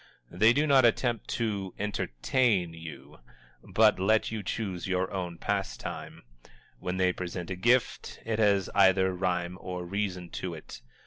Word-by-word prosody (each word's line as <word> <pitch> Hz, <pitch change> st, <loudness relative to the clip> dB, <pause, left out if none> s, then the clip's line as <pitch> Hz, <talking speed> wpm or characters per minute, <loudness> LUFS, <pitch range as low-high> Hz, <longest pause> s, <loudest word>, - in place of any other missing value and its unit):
They 110 Hz, +6 st, +5 dB
do 145 Hz, +5 st, +2 dB
not 135 Hz, -3 st, +5 dB
attempt 120 Hz, -1 st, +2 dB
to 100 Hz, -5 st, -2 dB
"entertain" 105 Hz, -, 0 dB
you, 75 Hz, -3 st, -10 dB, 0.4 s
but 110 Hz, -3 st, +3 dB
let 110 Hz, +4 st, +2 dB
you 110 Hz, -1 st, -3 dB
choose 95 Hz, -2 st, -4 dB
your 95 Hz, 0 st, 0 dB
own 90 Hz, -3 st, -4 dB
pastime. 100 Hz, +2 st, -4 dB, 0.6 s
When 90 Hz, +1 st, -3 dB
they 90 Hz, -1 st, +2 dB
present 90 Hz, 0 st, -5 dB
a -, -, -1 dB
gift, 120 Hz, +4 st, +1 dB
it 110 Hz, -1 st, -1 dB
has 100 Hz, -3 st, +3 dB
either 95 Hz, -1 st, +4 dB
rhyme 90 Hz, -1 st, -2 dB
or 90 Hz, -1 st, -5 dB
reason 90 Hz, -2 st, -3 dB
to 90 Hz, -2 st, -4 dB
it. 80 Hz, -, -11 dB
95 Hz, 145 wpm, -29 LUFS, 90-110 Hz, 0.6 s, They